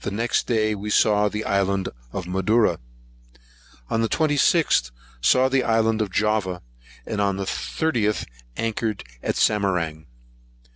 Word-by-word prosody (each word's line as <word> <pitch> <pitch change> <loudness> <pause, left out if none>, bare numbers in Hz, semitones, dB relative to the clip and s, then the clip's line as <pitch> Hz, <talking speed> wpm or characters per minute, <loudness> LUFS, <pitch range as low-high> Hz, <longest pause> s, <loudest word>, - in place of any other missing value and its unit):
Next 115 +4 0
day 110 -3 +1
we 105 +1 -5
saw 105 -1 +3
the 105 +1 -4
island 100 -1 0 0.2
of - - -4
Madura. 95 +5 +1 1.1
On 115 - +1
the 115 - 0
26th, 155 - +2 0.3
saw 130 - +4
the 130 -1 +1
island 115 -1 +2
of 105 - -1
Java; 100 -3 0 0.4
and 105 -2 -2
on 100 -1 +1
the 100 - -3
30th, 110 - -1 0.3
anchored 110 -2 -2 0.2
at - - -2
Samarang. 90 -7 0
105 Hz, 130 wpm, -23 LUFS, 100-115 Hz, 1.1 s, saw